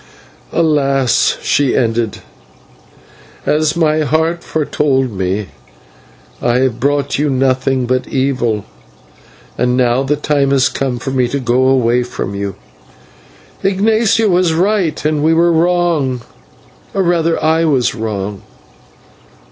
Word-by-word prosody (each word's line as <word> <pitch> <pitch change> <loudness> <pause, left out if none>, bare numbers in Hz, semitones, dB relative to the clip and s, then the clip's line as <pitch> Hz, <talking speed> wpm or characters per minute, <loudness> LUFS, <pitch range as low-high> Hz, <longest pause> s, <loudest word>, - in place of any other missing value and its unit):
"Alas!" 140 -6 +2
she 140 -2 +1
ended, 115 -2 -1 1.2
"as 155 +1 +1
my 155 -2 +2
heart 160 +3 0
foretold 140 -4 0
me, 95 +1 -3 0.9
I 120 0 +1
have 125 -3 0
brought 140 +2 0
you 150 0 +1
nothing 130 -1 +1
but 130 +1 -1
evil, 125 -6 -1 0.9
and 125 0 +1
now 125 0 +2
the 135 +2 0
time 145 -1 0
has 135 -1 +3
come 130 -3 -2
for 135 +3 -5
me 130 -2 +1
to 140 +3 -3
go 130 +1 +1
away 125 -2 +2
from 120 -5 -5
you. 100 -1 -4 1.1
Ignatio 215 +3 +2
was 180 -3 +2
right, 185 -2 0
and 155 -1 0
we 160 +1 +3
were 170 +1 +3
wrong 165 -6 +1 0.7
or 195 - +2
rather 170 -2 +1
I 160 +1 +2
was 130 -6 +1
wrong. 105 -3 -4
135 Hz, 125 wpm, -15 LUFS, 125-160 Hz, 1.2 s, has